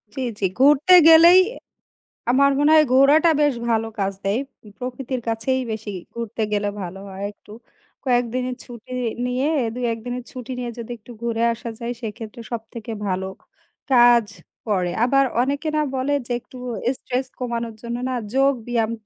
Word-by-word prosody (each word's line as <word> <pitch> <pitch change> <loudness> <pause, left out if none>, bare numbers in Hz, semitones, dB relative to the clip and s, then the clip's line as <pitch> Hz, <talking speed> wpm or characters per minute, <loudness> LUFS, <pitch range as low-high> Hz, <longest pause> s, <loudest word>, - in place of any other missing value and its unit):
জি, 265 - -3 0.2
জি। 200 - +1
ঘুরতে 295 +6 +5
গেলেই 335 +3 +9 0.9
আমার 280 +2 +4
মনে 295 +2 +4
হয় 310 -1 +6
ঘোরাটা 285 +5 +6
বেশ 290 -2 +3 0.2
ভালো 225 -1 +1
কাজ 195 0 0
দেয়। 200 +5 +1 0.4
প্রকৃতির 255 0 -4
কাছেই 230 +4 0
বেশি 220 -1 -5 0.2
ঘুরতে 230 -1 -5
গেলে 205 0 0
ভালো 185 +1 -6
হয় 190 +1 -7
একটু। 210 - -19 0.5
কয়েকদিনের 250 0 0
ছুটি 240 0 -12 0.3
নিয়ে, 250 +3 0 0.3
২-১ 240 -2 -1
দিনের 245 0 -4
ছুটি 255 -1 -8
নিয়ে 245 -1 -3
যদি 235 0 -7
একটু 225 +2 -15
ঘুরে 230 -1 -1
আসা 235 +1 -7
যায় 235 0 -3
সেক্ষেত্রে 225 0 -7
সব 235 -2 -2
থেকে 230 -1 -7 0.2
ভালো 190 0 -1 0.7
কাজ 240 -2 +6 0.4
করে। 185 -4 0
আবার 275 +2 +4 0.2
অনেকে 280 +5 -1
না - - +3
বলে 265 +2 0
যে - - -6
একটু 255 - -15 0.4
স্ট্রেস 255 +1 -3
কমানোর 235 -2 -3
জন্য 235 0 -4
না - - -2 0.2
যোগব্যায়াম 245 -4 +1
245 Hz, 155 wpm, -22 LUFS, 225-265 Hz, 0.9 s, গেলেই